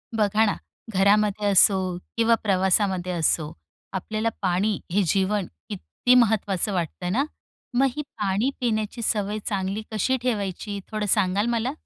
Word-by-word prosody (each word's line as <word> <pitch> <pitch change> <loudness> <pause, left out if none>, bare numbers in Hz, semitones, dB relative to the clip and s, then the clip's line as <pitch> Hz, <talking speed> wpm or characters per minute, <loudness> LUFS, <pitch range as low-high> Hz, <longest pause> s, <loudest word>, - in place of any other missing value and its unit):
बघा 215 0 +3
ना, 205 - 0 0.4
घरामध्ये 205 +2 +3
असो 190 -2 +4 0.2
किंवा 230 0 +4
प्रवासामध्ये 190 -2 +1
असो, 160 -2 +1 0.4
आपल्याला 215 +4 -2
पाणी 190 +2 0
हे 200 +3 +2
जीवन 195 +2 +1 0.2
किती 85 - 0
महत्त्वाचं 210 -4 +2
वाटतं 180 0 -3
ना. 255 +8 +2 0.5
मग 270 +1 +4
ही 300 - -2
पाणी 210 -3 -1
पिण्याची 220 -1 -2
सवय 210 -1 0
चांगली 195 0 -2
कशी 240 +5 +1
ठेवायची, 205 -4 -3
थोडं 215 -1 -2
सांगाल 195 0 +2
मला? 235 +2 0
205 Hz, 130 wpm, -24 LUFS, 190-220 Hz, 0.5 s, असो